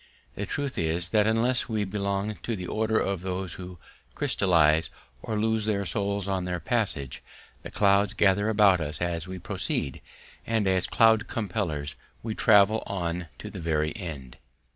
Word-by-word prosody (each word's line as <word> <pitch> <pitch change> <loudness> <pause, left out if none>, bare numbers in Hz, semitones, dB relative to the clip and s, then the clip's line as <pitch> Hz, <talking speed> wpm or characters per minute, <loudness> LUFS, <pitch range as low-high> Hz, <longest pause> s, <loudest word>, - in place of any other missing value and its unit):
The - - -5
truth 145 -2 -3
is 85 +2 +3
that 105 0 +3
unless 120 +4 +1
we 110 -2 0
belong 100 +1 -2
to 115 - -3
the 90 -3 -6
order 110 +3 0
of 95 -3 -1
those 90 -2 -4
who 90 -1 -9 0.4
crystallize 80 -4 +3 0.3
or 110 -1 -3
lose 110 0 +1
their 100 -2 0
souls 100 +2 -1
on 95 -2 -1
their 90 -1 -2
passage, 80 - -1 0.4
the - - -8
clouds 100 +1 +2
gather 100 +1 +3
about 100 -5 +4
us 75 -1 -4
as 85 -1 -2
we 95 0 -6
proceed, 70 -5 -3 0.4
and 110 -2 0
as 95 -1 +1
cloud 110 0 +4
compellers 90 - -3 0.3
we 110 -1 -3
travel 110 0 +4
on 90 -2 -3
to - - -8
the - - -7
very 80 -1 0
end. 70 - -7
100 Hz, 165 wpm, -27 LUFS, 85-110 Hz, 0.4 s, about